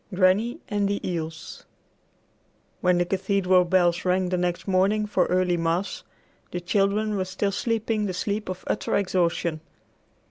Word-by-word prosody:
VIII 185 - -8
GRANNY 200 +5 +3
AND 205 -1 0
THE 200 - -2
EELS 165 -2 -5 1.2
When 180 -1 +3
the 175 - +2
cathedral 190 -1 +2
bells 175 -1 +2
rang 185 0 +1
the 180 - 0
next 175 +1 -2
morning 195 +3 +2
for 190 -3 +1
early 180 -1 +1
mass, 170 +4 -1 0.5
the 180 - -4
children 200 +3 +1
were 190 - -1
still 190 +2 -1
sleeping 220 0 -1
the 185 - -3
sleep 205 +2 -2
of 185 0 -5
utter - - -1
exhaustion. 170 -4 0
185 Hz, 150 wpm, -25 LUFS, 180-200 Hz, 1.2 s, GRANNY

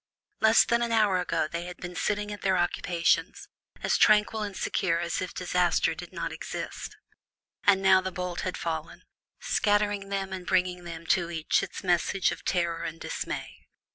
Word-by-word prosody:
Less 220 +1 +6
than 235 0 +2
an 235 -1 0
hour 210 -5 +3
ago 165 -3 0
they 170 +2 -5
had 180 0 -8
been 180 0 -7
sitting 205 +2 -1
at 205 - -9
their 190 -1 +2
occupations, 175 -1 0 0.4
as - - +2
tranquil 215 0 +4
and 205 -2 -4
secure 170 -3 0
as 170 0 -2
if 185 - -4
disaster 180 -1 +1
did - - -9
not - - -4
exist; - - -6 0.7
and 195 -1 +5
now 190 -1 +6
the 190 0 -4
bolt 180 -1 -4
had 185 - -3
fallen, 160 -2 -4 0.4
scattering 205 -1 +1
them 195 -1 -2
and 180 -2 -6
bringing 180 -1 +1 0.2
to 175 0 +2
each 160 -2 +1
its - - -6
message 180 +1 +2
of - - -7
terror 170 -2 0
and 165 0 -5
dismay. - - -5
185 Hz, 170 wpm, -28 LUFS, 175-200 Hz, 0.7 s, Less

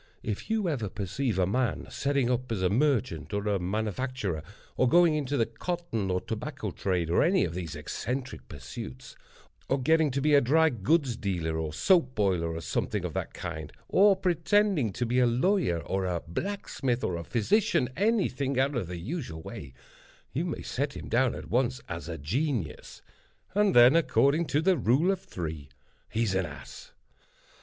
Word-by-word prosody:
If 105 - -4
you 220 -4 +1
ever 125 - -1
perceive 105 +5 -2
a 95 - +3
man 105 - 0
setting 140 -3 0
up 125 0 -2
as 100 -5 -1
a 90 - +2
merchant 130 -3 0
or 100 +1 -2
a 100 -2 +1
manufacturer, 105 - -2 0.3
or 130 - +3
going 170 0 +5
into 145 -2 -1
the 115 - +3
cotton 170 - -3
or 90 0 +1
tobacco - - -5
trade, 90 -4 -1
or - - +4
any 185 +4 +3
of 85 - -4
those 85 -3 -5
eccentric 125 - -5
pursuits; 65 0 -8 0.5
or - - +2
getting 160 +3 +3
to 135 +1 -1
be 150 +2 +2
a 140 - +7
drygoods 140 - +2
dealer, 85 -7 -2
or 80 -1 -2
soap 130 - +3
boiler, 90 -6 +1
or 85 - -4
something - - -2
of - - -4
that - - -4
kind; 80 -3 -6 0.2
or 200 +1 +6
pretending 190 - +2
to 125 - -1
be 125 +2 +1
a 125 - +5
lawyer, 130 - +2
or 95 +2 -2
a 85 -2 -2
blacksmith, 135 - -2
or 90 - 0
a 85 - -4
physician—any 195 - +1
thing 135 0 -2
out 135 +2 +2
of 115 -8 -2
the 90 0 -5
usual 90 - -5
way—you 70 - -8
may 170 - -4
set 140 +2 -2
him - - -8
down 125 +1 +2
at - - -9
once 125 +1 +1
as 85 -2 -6
a 85 - -4
genius, 110 - -3 0.5
and 205 -1 +3
then, 120 +4 +8
according 160 -1 +3
to 145 +3 +1
the 185 0 +4
rule 135 - +3
of 195 - -1
three, 80 -4 -6 0.4
he's 110 -3 0
an 95 -2 0
ass. 75 - -11
125 Hz, 175 wpm, -28 LUFS, 90-150 Hz, 0.5 s, then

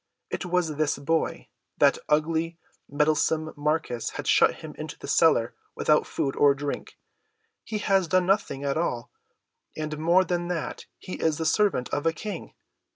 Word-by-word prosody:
It 180 - -3
was 175 -4 0
this 155 -1 +1
boy. 160 +3 -1 0.3
That - - +4
ugly, 160 +2 +1 0.3
meddlesome 155 +2 +1
Marcus 150 -5 -1
had - - -5
shut - - +4
him - - -9
into - - -7
the - - -9
cellar - - +3 0.2
without - - +2
food 135 - -2
or 140 -1 +5
drink. 145 +1 -5 0.7
He 215 - -4
has 195 -3 +2
done 185 +1 +2
nothing 190 -8 0
at 140 +1 0
all, 120 -8 -2 0.7
and 155 -1 -4
more 170 +4 +4
than 175 -1 -2
that 175 -3 -4
he 185 - -8
is 160 -2 +1
the 160 - -2
servant 170 -6 +2
of 145 +3 -1
a 165 - +2
King. 195 +1 -7
160 Hz, 160 wpm, -26 LUFS, 150-175 Hz, 0.7 s, or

